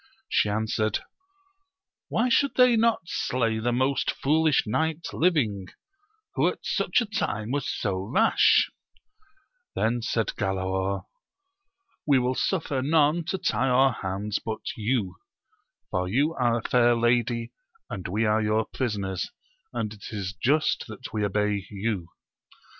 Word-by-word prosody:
She 105 Hz, -, +2 dB
answered, 110 Hz, 0 st, -1 dB, 1.1 s
Why 230 Hz, -, +1 dB
should 280 Hz, +3 st, +2 dB
they 250 Hz, -2 st, +6 dB
not 230 Hz, -4 st, +2 dB
slay 115 Hz, -8 st, -1 dB
the 120 Hz, +2 st, 0 dB
most 130 Hz, +3 st, +1 dB
foolish 155 Hz, +1 st, +2 dB
knight 160 Hz, +8 st, -1 dB
living, 115 Hz, -, +1 dB, 0.7 s
who -, -, +2 dB
at -, -, -1 dB
such -, -, +1 dB
a -, -, -1 dB
time 115 Hz, -, -2 dB
was 140 Hz, -1 st, -1 dB
so 95 Hz, -4 st, -2 dB
rash -, -, +4 dB, 1.0 s
1 110 Hz, +1 st, +1 dB
Then 120 Hz, -, -3 dB
said 115 Hz, -1 st, -1 dB
Galaor, 95 Hz, -1 st, -1 dB, 1.0 s
We 140 Hz, -2 st, +5 dB
will 125 Hz, 0 st, +1 dB
suffer 145 Hz, -3 st, -1 dB
none 155 Hz, +3 st, +2 dB
to 190 Hz, +3 st, -2 dB
tie 135 Hz, -7 st, 0 dB
our 130 Hz, +1 st, +4 dB
hands 100 Hz, +1 st, -3 dB
but 110 Hz, -1 st, -4 dB
you; 105 Hz, -5 st, -1 dB, 0.7 s
for 90 Hz, 0 st, -1 dB
you 140 Hz, -, +1 dB
are 120 Hz, -5 st, +1 dB
a 115 Hz, -, -5 dB
fair 120 Hz, -1 st, +4 dB
lady, 120 Hz, 0 st, +1 dB, 0.4 s
and 95 Hz, -, -5 dB
we 105 Hz, +5 st, 0 dB
are 110 Hz, +1 st, +2 dB
your 110 Hz, +1 st, +1 dB
prisoners, 100 Hz, -7 st, -3 dB, 0.4 s
and 110 Hz, -1 st, -3 dB
it 105 Hz, -, -13 dB
is 100 Hz, -3 st, -4 dB
just 145 Hz, +9 st, +1 dB
that 110 Hz, -3 st, -9 dB
we 105 Hz, -1 st, -1 dB
obey 105 Hz, 0 st, 0 dB
you. 100 Hz, -4 st, -3 dB
115 Hz, 140 wpm, -26 LUFS, 105-140 Hz, 1.1 s, they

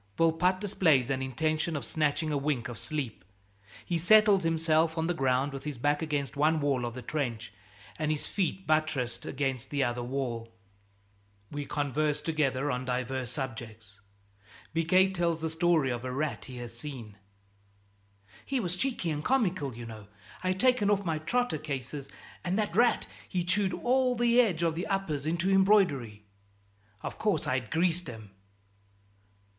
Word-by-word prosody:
Volpatte 165 Hz, +3 st, +3 dB
displays 160 Hz, -, +2 dB
an 135 Hz, 0 st, -1 dB
intention 155 Hz, +5 st, -1 dB
of 145 Hz, -, -3 dB
snatching 155 Hz, 0 st, 0 dB
a 145 Hz, -, +1 dB
wink 135 Hz, -5 st, -1 dB
of 120 Hz, -3 st, -7 dB
sleep. 135 Hz, -, -4 dB, 0.6 s
He 170 Hz, -2 st, 0 dB
settles 210 Hz, +2 st, +6 dB
himself 165 Hz, 0 st, +2 dB
on 160 Hz, -, +1 dB
the 175 Hz, -, +1 dB
ground 135 Hz, -1 st, +1 dB
with 135 Hz, -, -6 dB
his 150 Hz, -4 st, -4 dB
back 145 Hz, +5 st, +1 dB
against 145 Hz, -5 st, -2 dB
one 155 Hz, +3 st, +3 dB
wall 140 Hz, -4 st, +1 dB
of 120 Hz, 0 st, -5 dB
the 125 Hz, -, -7 dB
trench 120 Hz, -8 st, -3 dB, 0.5 s
and 155 Hz, -1 st, 0 dB
his 155 Hz, -1 st, 0 dB
feet 190 Hz, -1 st, -2 dB
buttressed 140 Hz, -6 st, 0 dB
against 135 Hz, -2 st, -2 dB
the 140 Hz, -2 st, +1 dB
other 120 Hz, -1 st, -1 dB
wall. 120 Hz, -3 st, -3 dB, 1.0 s
We 145 Hz, -1 st, -4 dB
converse 150 Hz, +1 st, 0 dB
together 145 Hz, -3 st, 0 dB
on 125 Hz, 0 st, -2 dB
divers 130 Hz, 0 st, -2 dB
subjects. 110 Hz, -6 st, -6 dB, 0.7 s
Biquet 185 Hz, +4 st, +4 dB
tells 170 Hz, -2 st, 0 dB
the 160 Hz, 0 st, -2 dB
story 160 Hz, -4 st, +2 dB
of 120 Hz, 0 st, -3 dB
a 130 Hz, -, -3 dB
rat 145 Hz, +3 st, -2 dB
he 130 Hz, -1 st, -9 dB
has 120 Hz, -1 st, -7 dB
seen: 120 Hz, -6 st, -7 dB, 1.3 s
"He 270 Hz, -1 st, -1 dB
was 180 Hz, -5 st, -1 dB
cheeky 210 Hz, -6 st, -1 dB
and 150 Hz, 0 st, -3 dB
comical, 185 Hz, -, +1 dB
you 120 Hz, 0 st, -7 dB
know. 110 Hz, -3 st, -9 dB, 0.4 s
I'd 185 Hz, 0 st, 0 dB
taken 250 Hz, -4 st, +4 dB
off 200 Hz, -1 st, +2 dB
my 160 Hz, -2 st, 0 dB
trotter 240 Hz, +1 st, 0 dB
cases, 140 Hz, -1 st, -5 dB, 0.3 s
and 180 Hz, +2 st, 0 dB
that 210 Hz, -5 st, -1 dB
rat, 240 Hz, +2 st, +4 dB, 0.2 s
he 180 Hz, -3 st, 0 dB
chewed 190 Hz, +2 st, +1 dB
all 255 Hz, 0 st, +2 dB
the 240 Hz, +1 st, +5 dB
edge 180 Hz, -8 st, 0 dB
of 165 Hz, -1 st, +2 dB
the 170 Hz, +3 st, -3 dB
uppers 165 Hz, -8 st, -1 dB
into 170 Hz, +4 st, +1 dB
embroidery. 180 Hz, -, +3 dB, 0.8 s
Of -, -, -5 dB
course, 210 Hz, -2 st, +1 dB
I'd 125 Hz, -3 st, -1 dB
greased 170 Hz, -1 st, +1 dB
'em." 110 Hz, -4 st, -10 dB
155 Hz, 160 wpm, -29 LUFS, 130-175 Hz, 1.3 s, settles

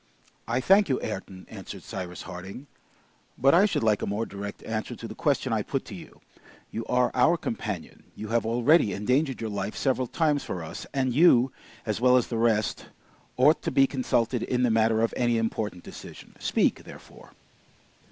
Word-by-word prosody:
"I 120 Hz, +3 st, 0 dB
thank 195 Hz, +5 st, +4 dB
you, 130 Hz, -, +1 dB
Ayrton," 95 Hz, -3 st, -6 dB
answered -, -, -9 dB
Cyrus 90 Hz, -2 st, -6 dB
Harding, 95 Hz, +8 st, -8 dB, 0.7 s
"but 135 Hz, +2 st, +4 dB
I 190 Hz, +5 st, +6 dB
should 190 Hz, -, -1 dB
like 110 Hz, -2 st, +2 dB
a -, -, -2 dB
more 105 Hz, +3 st, -1 dB
direct 100 Hz, 0 st, -7 dB
answer 110 Hz, -1 st, -4 dB
to -, -, -8 dB
the -, -, -8 dB
question -, -, 0 dB
I -, -, +1 dB
put -, -, -3 dB
to -, -, -10 dB
you. -, -, -12 dB, 0.5 s
You 115 Hz, -, -4 dB
are 125 Hz, 0 st, +2 dB
our 130 Hz, +7 st, +4 dB
companion; 105 Hz, -, -5 dB
you 110 Hz, -, -7 dB
have 115 Hz, +1 st, +1 dB
already 120 Hz, -, +3 dB
endangered 130 Hz, +6 st, 0 dB
your 110 Hz, -1 st, -3 dB
life 100 Hz, +1 st, -3 dB
several 130 Hz, -2 st, 0 dB
times 150 Hz, 0 st, +1 dB
for 90 Hz, -, -5 dB
us, 80 Hz, -, -8 dB
and 130 Hz, -3 st, 0 dB
you, 130 Hz, -4 st, +5 dB, 0.3 s
as 110 Hz, 0 st, -2 dB
well 125 Hz, 0 st, +6 dB
as 125 Hz, -, 0 dB
the 115 Hz, -, -2 dB
rest, 110 Hz, -2 st, +1 dB, 0.5 s
ought 145 Hz, +5 st, +4 dB
to -, -, -2 dB
be 135 Hz, -, +4 dB
consulted 125 Hz, -3 st, 0 dB
in 125 Hz, 0 st, 0 dB
the 120 Hz, -, +3 dB
matter 110 Hz, 0 st, +3 dB
of 115 Hz, -, 0 dB
any 120 Hz, -2 st, +1 dB
important 110 Hz, -5 st, -2 dB
decision. -, -, -11 dB
Speak, -, -, +1 dB
therefore." -, -, -14 dB
115 Hz, 185 wpm, -26 LUFS, 105-130 Hz, 0.7 s, I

